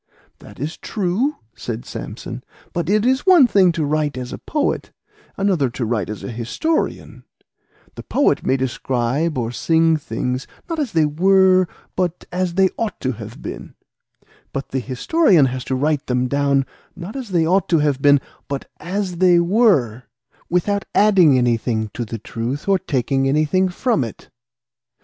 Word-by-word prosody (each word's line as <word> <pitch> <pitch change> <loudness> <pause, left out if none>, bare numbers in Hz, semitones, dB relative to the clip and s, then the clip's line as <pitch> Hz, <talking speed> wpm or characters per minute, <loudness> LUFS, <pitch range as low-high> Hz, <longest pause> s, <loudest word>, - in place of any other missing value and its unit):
"That - - -14
is 150 +5 -4
true," 215 +9 -1 0.2
said 115 0 -6
Samson; - - -7 0.3
"but 170 -1 -2
it 215 +2 +2
is 260 +2 +2
one 355 -7 +8
thing 195 -6 +4
to 160 -3 -1
write 150 -1 -1
as 125 -1 -5
a - - -6
poet, 300 - -2 0.5
another 185 -9 +1
to 120 0 -4
write 110 -4 -1
as 105 - -6
a - - -5
historian; 120 - -2 0.7
the - - -8
poet 280 - +1
may 135 - +1
describe 130 +4 -1
or 115 -2 -2
sing 165 +4 +2
things, 125 -1 -3 0.2
not 330 -2 -3
as 285 -6 -2
they 160 -2 +3
were, 185 +4 +4 0.3
but 180 -2 -2
as 180 -1 -1
they 190 0 +4
ought 220 -5 -2
to 130 - 0
have 115 - -9
been; - - -8 0.8
but 135 - -5
the 135 - -1
historian 160 - +3
has 130 -1 -3
to 130 - -1
write 150 +2 0
them 125 0 0
down, 140 0 +1 0.3
not 180 +6 -8
as 260 -5 -6
they 170 -4 +2
ought 185 +2 +2
to 170 - +4
have 145 -3 +1
been, 145 0 +6 0.3
but 140 -1 -4
as 185 +1 -3
they 180 -1 +5
were, 170 - +2 0.4
without 200 +3 0
adding 190 -9 +5
anything 115 -3 0
to 120 - -4
the 115 +1 -5
truth 115 - -5
or 195 -1 +3
taking 135 -2 0
anything 155 +6 +2
from 200 - 0
it." 115 - -9
155 Hz, 165 wpm, -20 LUFS, 130-190 Hz, 0.8 s, one